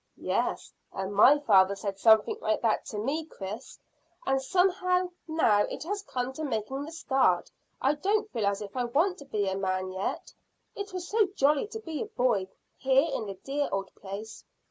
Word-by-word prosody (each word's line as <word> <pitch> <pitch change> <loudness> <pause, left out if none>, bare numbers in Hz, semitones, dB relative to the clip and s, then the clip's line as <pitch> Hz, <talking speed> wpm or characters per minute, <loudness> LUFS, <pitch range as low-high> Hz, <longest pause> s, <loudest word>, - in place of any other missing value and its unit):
"Yes, - - -2 0.2
and 195 +1 -4
my 260 +8 +7
father 200 -8 +4
said 195 0 -5
something 220 0 +5
like 215 +2 0
that 225 - +1
to 210 - -6
me, 275 +10 -1
Chris; 210 -4 -8 0.5
and 270 0 +1
somehow 365 +3 +2 0.2
now 315 -10 +3
it - - -6
has 400 +5 -3
come 255 -8 -3
to 310 - -5
making 265 +1 -2
the 315 - -8
start 265 - +1 0.3
I 275 +3 +3
don't 405 +9 0
feel 215 -3 0
as 200 +1 -1
if 200 0 -10
I 250 -1 0
want 330 +10 +1
to 285 - -11
be 210 -7 -1
a 190 - 0
man 185 -1 -1
yet. 190 +1 -4 0.4
It 400 0 -5
was 365 -1 -5
so 430 0 +3
jolly 290 +3 +3
to 445 +1 -7
be 325 -8 -5
a - - -3
boy 235 -7 +1 0.3
here 270 +4 +3
in 220 - -2
the 195 - -5
dear 280 +7 -2
old 195 -1 -3
place. 205 +3 -8
265 Hz, 190 wpm, -28 LUFS, 205-320 Hz, 0.5 s, my